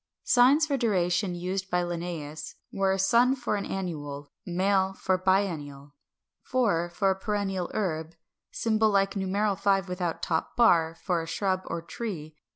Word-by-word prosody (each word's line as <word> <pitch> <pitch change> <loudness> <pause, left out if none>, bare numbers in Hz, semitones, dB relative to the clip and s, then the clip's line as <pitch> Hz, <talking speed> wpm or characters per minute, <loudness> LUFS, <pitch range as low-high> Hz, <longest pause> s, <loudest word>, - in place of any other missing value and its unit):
Signs 265 +6 +5
for 285 -3 0
duration 185 -5 +1
used 185 +2 -3
by 180 0 +1
Linnæus 165 -3 -5 0.2
were 195 -1 +2
☉ 235 +7 +3
for 240 -4 -1
an 200 - -3
annual, 145 -6 -5 0.2
♂ 190 +2 +1
for 190 - 0
a - - +3
biennial, 160 -7 -1 0.6
♃ 175 -10 +2
for 195 +3 +2
a - - 0
perennial 195 -2 -2
herb, 165 -5 -2 0.3
[Symbol 220 -1 +1
like 195 -1 +2
numeral 200 +1 0
5 195 -1 +1
without 180 -2 -3
the - - +1
top 160 -1 -1
bar] 165 -9 +4
for 175 -3 0
a 165 - -7
shrub 185 +2 0
or 165 0 -4
tree. 160 -4 -6
190 Hz, 160 wpm, -27 LUFS, 170-200 Hz, 0.6 s, Signs